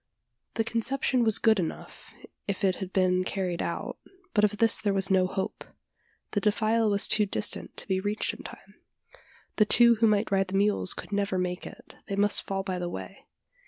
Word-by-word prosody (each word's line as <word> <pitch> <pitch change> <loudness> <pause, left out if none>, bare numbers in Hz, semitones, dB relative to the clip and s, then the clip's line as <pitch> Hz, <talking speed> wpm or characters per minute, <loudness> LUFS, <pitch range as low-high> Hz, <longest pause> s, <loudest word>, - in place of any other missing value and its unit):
The 225 - +1
conception 240 +2 0
was 220 -2 +3
good 220 -3 +3
enough, 165 -3 -6 0.3
if 200 -1 -3
it 190 -1 +3
could - - -7
have 190 -1 -5
been 185 -1 +2
carried 185 -2 -2
out, - - -4 0.3
but 210 - +2
of 210 0 +2
this 225 +1 +3
there 205 -2 0
was 195 0 0
no 185 -1 +3
hope. 190 +2 -4 0.7
The 205 - -1
defile 220 +1 +2
was 200 -1 +2
too 210 -1 +2
distant 205 - -2
to - - -3
be 190 -2 0
reached 205 +2 -1
in - - -10
time. - - -12 0.8
The 215 - +5
two 235 +2 +5
who 225 +1 +4
might 210 0 +1
ride 195 -1 +2
the 190 +1 -2
mules 205 -2 +1
could - - -9
never 200 -2 -1
make 180 0 -3
it - - -14
they 200 - -3
must 205 +1 +3
fall 195 0 -2
by 185 -2 -3
the 175 0 -3
way. - - -9
200 Hz, 200 wpm, -27 LUFS, 190-215 Hz, 0.8 s, The